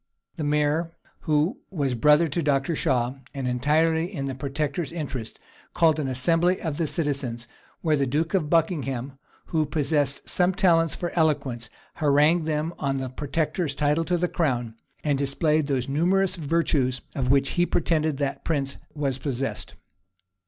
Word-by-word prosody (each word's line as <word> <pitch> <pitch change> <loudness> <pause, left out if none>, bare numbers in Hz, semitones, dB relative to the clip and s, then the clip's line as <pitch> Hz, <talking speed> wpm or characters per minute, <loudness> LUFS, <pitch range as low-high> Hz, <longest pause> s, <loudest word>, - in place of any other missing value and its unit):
The 155 - -3
mayor, 150 +3 0 0.3
who 150 +4 +2
was 140 -8 -1
brother 150 +7 +4
to 160 +3 -2
Dr. 145 +1 +1
Shaw, 125 -1 0 0.2
and 135 -2 -2
entirely 160 +7 +1
in 140 -8 -4
the 135 - -3
protector's 145 +4 -3
interests, 140 -9 -5 0.4
called 160 -2 +4
an 145 - -1
assembly 165 +8 +2
of 155 -4 -3
the 165 - +1
citizens; 135 -7 -1 0.3
where 155 -3 +2
the 140 -2 0
duke 155 +7 -1
of 165 -6 +1
Buckingham, 140 -6 0 0.3
who 160 -1 +3
possessed 145 -1 0
some 180 0 +2
talents 165 -4 +3
for 175 - -3
eloquence, 140 -8 0 0.3
harangued 155 +2 +3
them 155 +2 -1
on 140 -2 0
the 130 -1 -3
protector's 150 +3 -2
title 150 +3 +1
to 175 +1 +1
the 180 +1 +1
crown, 125 -10 -1 0.3
and 145 -3 +1
displayed 150 +2 +1
those 130 -3 -1
numerous 180 +7 +2
virtues 145 -6 0
of 130 -2 -1
which 135 0 +3
he 175 0 +1
pretended 155 -3 +1
that 140 -1 -2
prince 140 -4 -1 0.2
was 140 -3 -1
possessed. 135 0 -3
150 Hz, 155 wpm, -25 LUFS, 135-165 Hz, 0.4 s, brother